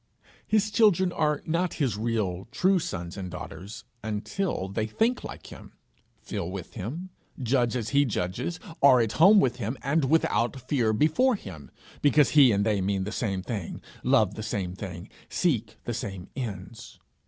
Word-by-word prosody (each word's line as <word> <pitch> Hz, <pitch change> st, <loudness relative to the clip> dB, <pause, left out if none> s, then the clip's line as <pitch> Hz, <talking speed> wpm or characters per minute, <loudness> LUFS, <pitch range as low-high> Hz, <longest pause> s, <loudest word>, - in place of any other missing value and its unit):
His 215 Hz, 0 st, +2 dB
children 195 Hz, -4 st, +4 dB
are 150 Hz, -3 st, 0 dB
not 170 Hz, +2 st, 0 dB
his 130 Hz, -9 st, 0 dB
real, 105 Hz, -4 st, -2 dB
true 185 Hz, +7 st, +3 dB
sons 90 Hz, -, -5 dB
and 95 Hz, -2 st, -5 dB
daughters 90 Hz, +3 st, -8 dB, 0.2 s
until 110 Hz, -, -2 dB
they 110 Hz, +3 st, -2 dB
think 225 Hz, -, 0 dB
like -, -, -9 dB
him, -, -, -12 dB, 0.5 s
feel 85 Hz, -, -4 dB
with 95 Hz, -2 st, -7 dB
him, 145 Hz, -, -6 dB, 0.3 s
judge 125 Hz, -1 st, +1 dB
as 115 Hz, -4 st, -2 dB
he 140 Hz, 0 st, +4 dB
judges, 120 Hz, -, -2 dB, 0.2 s
are 135 Hz, -3 st, +7 dB
at 115 Hz, -3 st, +1 dB
home 195 Hz, -, +7 dB
with 125 Hz, -7 st, +1 dB
him, 120 Hz, +2 st, -3 dB
and 140 Hz, +2 st, +2 dB
without 130 Hz, -4 st, +1 dB
fear 125 Hz, -3 st, +1 dB
before 160 Hz, -, +3 dB
him 90 Hz, -, -10 dB, 0.3 s
because 145 Hz, 0 st, +4 dB
he 140 Hz, -5 st, +7 dB
and 100 Hz, -1 st, +1 dB
they 105 Hz, -3 st, +1 dB
mean 95 Hz, 0 st, 0 dB
the 105 Hz, -, -4 dB
same 100 Hz, -5 st, -2 dB
thing, 105 Hz, -7 st, -5 dB, 0.2 s
love -, -, +3 dB
the -, -, -6 dB
same 100 Hz, -4 st, -3 dB
things, 95 Hz, -1 st, -7 dB, 0.2 s
seek 110 Hz, -10 st, 0 dB
the 120 Hz, -, -3 dB
same 95 Hz, -4 st, -5 dB
ends. 110 Hz, -4 st, -7 dB
115 Hz, 165 wpm, -27 LUFS, 100-150 Hz, 0.5 s, are